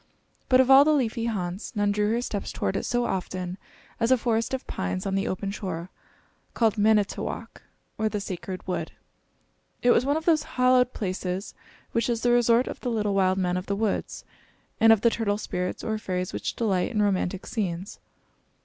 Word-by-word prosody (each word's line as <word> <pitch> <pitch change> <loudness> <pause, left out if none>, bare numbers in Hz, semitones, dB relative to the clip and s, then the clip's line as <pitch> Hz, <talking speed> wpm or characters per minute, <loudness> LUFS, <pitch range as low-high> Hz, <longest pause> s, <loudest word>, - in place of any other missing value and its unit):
But 255 - +6
of 260 +1 +5
all 270 +1 +9
the 310 +1 +3
leafy 230 -4 0
haunts, 190 -1 -4
none 205 -1 +2
drew 210 0 +1
her 240 +1 0
steps 205 -4 -4
toward - - -2
it - - -2
so 245 0 +1
often 185 -1 -3 0.4
as 230 0 +2
a 260 - +5
forest 230 -1 0
of 265 -1 -3
pines 90 0 -3
on 195 - -1
the 195 +1 0
open 195 +1 -3
shore, 185 -4 -5 0.6
called 225 -3 +2
Manitowok, 210 -1 0 0.4
or 220 0 +1
the 210 - -2
Sacred 185 -1 -6
Wood. 185 - -3 0.9
It 245 - +6
was 240 - +4
one 285 +3 +1
of 320 - -5
those 320 -3 +4 0.2
hallowed 255 0 +4
places 185 0 -3 0.4
which 230 +1 0
is 235 -1 0
the 245 - +2
resort 240 0 +4
of - - -6
the 250 - -3
little 210 -3 0
wild 190 -1 +2
men 180 -1 0
of 180 - -5
the 200 - 0
woods, 210 0 -2 0.5
and 225 0 +7
of 220 -3 +5
the 235 - +4
turtle 205 -3 0
spirits 180 -3 -4
or 220 -1 -2
fairies 180 -3 -3
which - - -3
delight 195 -6 0
in 210 -3 +1
romantic 190 -2 0
scenes. 190 -1 -4
210 Hz, 195 wpm, -26 LUFS, 185-235 Hz, 0.9 s, all